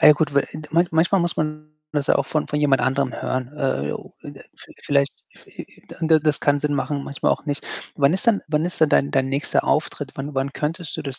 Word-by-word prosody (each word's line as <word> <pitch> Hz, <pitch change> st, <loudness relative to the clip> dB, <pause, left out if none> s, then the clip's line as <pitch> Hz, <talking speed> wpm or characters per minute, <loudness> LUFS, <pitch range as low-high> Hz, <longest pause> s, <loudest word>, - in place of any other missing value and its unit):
Ah, -, -, +7 dB
ja 150 Hz, -, +10 dB
gut, 150 Hz, -1 st, 0 dB
weil, 140 Hz, -, +2 dB
ind 155 Hz, -1 st, -9 dB
manch 170 Hz, +1 st, +2 dB
manchmal 170 Hz, +4 st, +3 dB
muss 170 Hz, 0 st, -1 dB
man 155 Hz, 0 st, -3 dB, 0.2 s
das 145 Hz, -2 st, -1 dB
ja -, -, +4 dB
auch 140 Hz, -, +1 dB
von 155 Hz, -, -1 dB
von 150 Hz, -, -2 dB
jemand 140 Hz, -3 st, +3 dB
anderem 130 Hz, +1 st, +1 dB
hören. 130 Hz, -1 st, -2 dB
Äh, 105 Hz, -, -1 dB, 0.4 s
inde -, -, -11 dB
viel -, -, -15 dB
vielleicht, 140 Hz, -1 st, 0 dB, 0.2 s
hi -, -, -20 dB, 0.2 s
hi -, -, -22 dB
dann 165 Hz, -, -4 dB
dann 160 Hz, -1 st, +5 dB
das 150 Hz, -1 st, +2 dB
kann 145 Hz, 0 st, +2 dB
Sinn 150 Hz, 0 st, 0 dB
machen, 140 Hz, 0 st, -1 dB
manchmal 140 Hz, -, 0 dB
auch -, -, -5 dB
nicht. 145 Hz, 0 st, -3 dB, 0.3 s
Wann 140 Hz, 0 st, +4 dB
ist 190 Hz, -, -1 dB
denn 215 Hz, -, +4 dB
wann 155 Hz, 0 st, 0 dB
ist 175 Hz, -1 st, -3 dB
denn 160 Hz, -, +5 dB
dein 140 Hz, -, +3 dB
dein 135 Hz, -1 st, +1 dB
nächster 140 Hz, +2 st, 0 dB
Auftritt? 145 Hz, -2 st, -1 dB
Wann 140 Hz, +2 st, -6 dB
Wann 135 Hz, +1 st, 0 dB
könntest 165 Hz, +3 st, -3 dB
du 160 Hz, -, -4 dB
das 135 Hz, -2 st, -4 dB
150 Hz, 250 wpm, -22 LUFS, 140-155 Hz, 0.4 s, ja